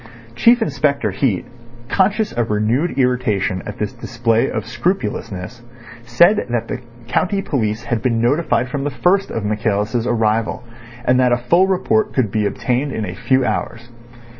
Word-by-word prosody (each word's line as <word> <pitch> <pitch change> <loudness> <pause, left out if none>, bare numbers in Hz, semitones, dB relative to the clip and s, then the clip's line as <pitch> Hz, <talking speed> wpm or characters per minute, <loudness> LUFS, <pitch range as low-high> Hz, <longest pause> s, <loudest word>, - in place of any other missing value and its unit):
Chief 235 - +4
Inspector 140 -2 0
Heat, 115 -10 0 0.4
conscious 205 - +1
of 120 -1 -1
renewed 115 +11 0
irritation 125 -8 +1
at - - -6
this 105 -2 -3
display 115 -1 0
of 110 - -3
scrupulousness, 120 - -3 0.4
said 170 - +3
that 120 -1 -1
the 130 - -4 0.3
county 185 +10 0
police 110 -4 -1
had 120 -2 -2
been 120 -3 +1
notified 130 +2 +1
from 135 +2 -3
the 145 - 0
first 195 +6 +1
of 110 -2 -3
Michaelis' 110 +2 -1
arrival, 115 +1 0 0.4
and 125 +1 +3
that 125 -1 +3
a 120 - +3
full 170 +10 +3
report 200 +3 +1
could 120 -7 +1
be 105 -1 +1
obtained 125 +7 -1
in 110 -4 -3
a 90 - -5
few 130 +6 +1
hours. 120 -1 -3
120 Hz, 160 wpm, -19 LUFS, 110-145 Hz, 0.4 s, Chief